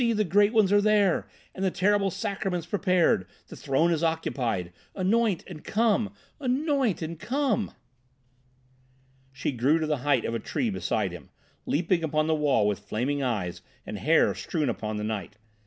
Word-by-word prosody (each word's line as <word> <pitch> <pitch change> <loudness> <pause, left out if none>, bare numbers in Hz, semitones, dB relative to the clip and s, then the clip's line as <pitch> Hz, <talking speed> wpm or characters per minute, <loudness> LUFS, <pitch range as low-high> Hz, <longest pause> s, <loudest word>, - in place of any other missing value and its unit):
the 215 -1 +2
Great 205 +4 +4
Ones 215 -4 +3
are 205 - +5
there, 205 -3 +3 0.3
and 190 - -5
the 190 - +3
terrible 195 +2 +2
Sacraments 190 -4 -3
prepared. 180 - +2 0.2
The - - -9
Throne 150 +5 +1
is 165 -1 0
occupied. 120 - -1 0.2
Anoint 205 0 +1
and 160 -5 -10
come! 215 - +1 0.3
Anoint 270 - 0
and 160 0 -5
come!" 240 0 -1 1.6
She 135 +2 -2
grew 135 +5 +2
to 160 - -1
the 150 -1 0
height 135 -2 +1
of 115 - -2
a 115 - -1
tree 230 - -2
beside 105 - -1
him, 90 - -10 0.4
leaping 165 +2 +1
upon 155 -1 +1
the 160 - +1
wall 145 -8 +2
with 105 -2 -1
flaming 135 +6 -2
eyes 95 -9 -2 0.2
and - - -6
hair - - +3
strewn 150 -5 -2
upon 110 -2 -3
the 105 - -3
night. 105 -2 -4
165 Hz, 165 wpm, -27 LUFS, 125-205 Hz, 1.6 s, are